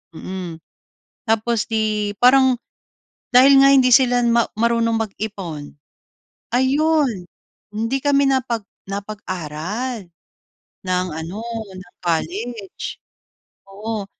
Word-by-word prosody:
mm. 180 Hz, 0 st, -6 dB, 0.7 s
Tapos, 225 Hz, 0 st, +1 dB
‘di, 215 Hz, -2 st, 0 dB
parang 260 Hz, +1 st, +6 dB, 0.8 s
dahil 265 Hz, +3 st, +7 dB
nga 275 Hz, -, +7 dB
hindi 260 Hz, -2 st, +5 dB
sila 245 Hz, 0 st, +5 dB
ma 235 Hz, 0 st, +3 dB
marunong 230 Hz, 0 st, +2 dB
mag-ipon, 195 Hz, -8 st, -6 dB, 0.8 s
ayun, 270 Hz, -, +2 dB, 0.5 s
hindi 225 Hz, +5 st, -1 dB
kami 280 Hz, -1 st, +3 dB
napag 250 Hz, -4 st, 0 dB, 0.2 s
napag-aral 200 Hz, +2 st, -5 dB, 0.8 s
ng 185 Hz, 0 st, 0 dB
ano, 165 Hz, +7 st, -6 dB, 0.3 s
ng 185 Hz, -1 st, -12 dB
college. 195 Hz, +6 st, -3 dB, 0.7 s
Oo, 210 Hz, +1 st, -5 dB
220 Hz, 90 wpm, -20 LUFS, 190-250 Hz, 0.8 s, dahil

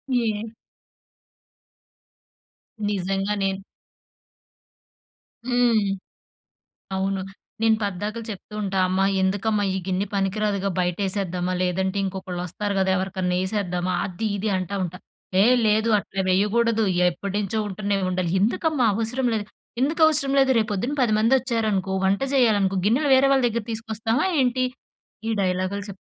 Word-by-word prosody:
ఏ 225 Hz, -2 st, 0 dB, 2.4 s
నిజంగా 195 Hz, +1 st, -1 dB
నేను 195 Hz, 0 st, 0 dB, 1.9 s
హ్మ్. 245 Hz, -3 st, +3 dB, 1.2 s
అవును. 195 Hz, 0 st, -1 dB, 0.4 s
నేను 225 Hz, -1 st, +4 dB
పద్దాకలు 205 Hz, +3 st, -3 dB
చెప్తూ 205 Hz, +1 st, -9 dB
ఉంటా, 195 Hz, -1 st, -1 dB
అమ్మ 185 Hz, +1 st, 0 dB, 0.2 s
ఎందుకమ్మా 205 Hz, +2 st, +1 dB
ఈ -, -, -1 dB
గిన్నె 190 Hz, +2 st, 0 dB
పనికి 195 Hz, +1 st, 0 dB
రాదుగా 200 Hz, -2 st, 0 dB
బయటేసేద్దామా, 185 Hz, 0 st, -1 dB
లేదంటే 190 Hz, +2 st, 0 dB
ఇంకొకళ్ళు 185 Hz, -2 st, -4 dB
వస్తారు 200 Hz, +4 st, -3 dB
గదా! 190 Hz, 0 st, +2 dB
ఎవరికన్నా 185 Hz, -1 st, -1 dB
యేసేద్దామా 185 Hz, -2 st, -1 dB
అది, 195 Hz, +4 st, -4 dB
ఇది 210 Hz, +2 st, -2 dB
అంటా 185 Hz, +2 st, -3 dB
ఉంటా. 180 Hz, +1 st, -6 dB, 0.4 s
"ఏహ్! 250 Hz, +3 st, +5 dB
లేదు 220 Hz, +2 st, +2 dB
అట్లా 195 Hz, -1 st, -3 dB
వేయ్యగూడదు. 220 Hz, +4 st, +2 dB, 0.3 s
ఎప్పటి 195 Hz, +3 st, -6 dB
నుంచో 210 Hz, +2 st, -2 dB
ఉంటున్నాయి 200 Hz, 0 st, -1 dB
ఉండలి," 180 Hz, -2 st, -1 dB
ఎందుకమ్మా 255 Hz, -, +1 dB
అవసరం 235 Hz, +4 st, -1 dB
లేదు. 210 Hz, -2 st, -2 dB, 0.4 s
"ఎందుకవసరం 305 Hz, -1 st, +3 dB
లేదు 265 Hz, -1 st, +4 dB
రేపొద్దున 215 Hz, +5 st, -1 dB
పది 215 Hz, -3 st, +2 dB
మందొచ్చారనుకో 225 Hz, -5 st, +1 dB
వంట 195 Hz, +1 st, +2 dB
చేయాలనుకో 205 Hz, -7 st, +3 dB
గిన్నెలు 275 Hz, +7 st, +2 dB
వేరే 270 Hz, +1 st, +5 dB
వాళ్ళ 265 Hz, -2 st, +3 dB
దగ్గర 230 Hz, -1 st, -3 dB
తీసుకొస్తామా 225 Hz, -, -1 dB
ఏంటి?" 255 Hz, 0 st, +2 dB, 0.6 s
ఈ -, -, +1 dB
డైలాగ్‌లు 185 Hz, +2 st, -1 dB
చెప్ 195 Hz, -1 st, -9 dB
205 Hz, 120 wpm, -24 LUFS, 190-230 Hz, 2.4 s, ఏహ్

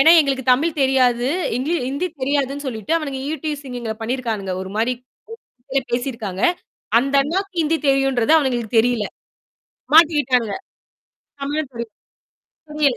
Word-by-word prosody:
ஏன்னா, 320 Hz, +4 st, +8 dB
எங்களுக்கு 270 Hz, -3 st, -1 dB
தமிழ் 300 Hz, +5 st, +1 dB
தெரியாது. 250 Hz, -2 st, +3 dB, 0.3 s
ஹிந் 255 Hz, +3 st, -2 dB, 0.2 s
ஹிந்தி 285 Hz, +7 st, -2 dB
தெரியாதுன்னு 280 Hz, +1 st, -1 dB
சொல்லிட்டு 220 Hz, -1 st, -3 dB
அவனுங்க 280 Hz, -4 st, -4 dB
ஈவ்டீசிங் 295 Hz, -5 st, -4 dB
எங்கள 225 Hz, -2 st, -3 dB
பண்ணியிருக்கானுங்க. 225 Hz, -6 st, -2 dB
ஒரு 190 Hz, -, -7 dB
மாதிரி 230 Hz, +3 st, +2 dB, 1.0 s
பேசியிருக்காங்க. 230 Hz, -6 st, -3 dB, 0.6 s
அந்த 275 Hz, +3 st, -1 dB
அண்ணாவுக்கு 380 Hz, +7 st, -2 dB
ஹிந்தி 320 Hz, +1 st, +1 dB
தெரியுன்றது 270 Hz, -2 st, +2 dB
அவனுங்களுக்கு 240 Hz, -6 st, -1 dB
தெரியல. 240 Hz, -2 st, +1 dB, 0.9 s
மாட்டிட்டாங்க. 290 Hz, -8 st, +4 dB, 0.9 s
தமிழும் 290 Hz, 0 st, -2 dB
தெரியும். 235 Hz, -2 st, -6 dB, 0.8 s
புரியல 295 Hz, -4 st, +2 dB
265 Hz, 115 wpm, -21 LUFS, 240-290 Hz, 1.0 s, ஏன்னா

